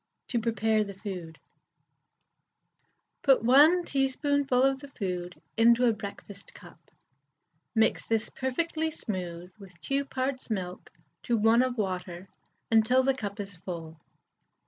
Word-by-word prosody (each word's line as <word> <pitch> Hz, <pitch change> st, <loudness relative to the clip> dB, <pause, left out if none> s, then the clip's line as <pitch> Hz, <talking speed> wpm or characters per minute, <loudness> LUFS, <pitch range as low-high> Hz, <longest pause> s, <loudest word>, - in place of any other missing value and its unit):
(To 240 Hz, -, 0 dB
Prepare 220 Hz, -1 st, +1 dB
the 200 Hz, -1 st, -8 dB
Food.) 180 Hz, -5 st, -7 dB, 1.8 s
Put 270 Hz, -5 st, +4 dB
1 300 Hz, +9 st, +6 dB
teaspoonful 275 Hz, -1 st, +1 dB
of 270 Hz, 0 st, +2 dB
the 280 Hz, -, -9 dB
food 180 Hz, -8 st, -5 dB, 0.2 s
into 235 Hz, +2 st, +5 dB
a 235 Hz, -, +4 dB
breakfast 200 Hz, -1 st, -9 dB
cup; -, -, -14 dB, 1.0 s
mix 225 Hz, 0 st, +2 dB
this 225 Hz, -1 st, 0 dB
perfectly 320 Hz, +5 st, -1 dB
smooth 180 Hz, -, -6 dB
with 185 Hz, -4 st, -14 dB
2 275 Hz, +1 st, -1 dB
parts 260 Hz, -1 st, -3 dB
milk 185 Hz, -4 st, -4 dB, 0.3 s
to 240 Hz, -2 st, 0 dB
1 225 Hz, +2 st, +4 dB
of 255 Hz, -1 st, -1 dB
water 185 Hz, -2 st, -3 dB, 0.4 s
until 225 Hz, +4 st, +4 dB
the 270 Hz, +1 st, +3 dB
cup 210 Hz, -5 st, -6 dB
is 200 Hz, -3 st, -7 dB
full. 165 Hz, -2 st, -7 dB
225 Hz, 125 wpm, -28 LUFS, 190-260 Hz, 1.8 s, 1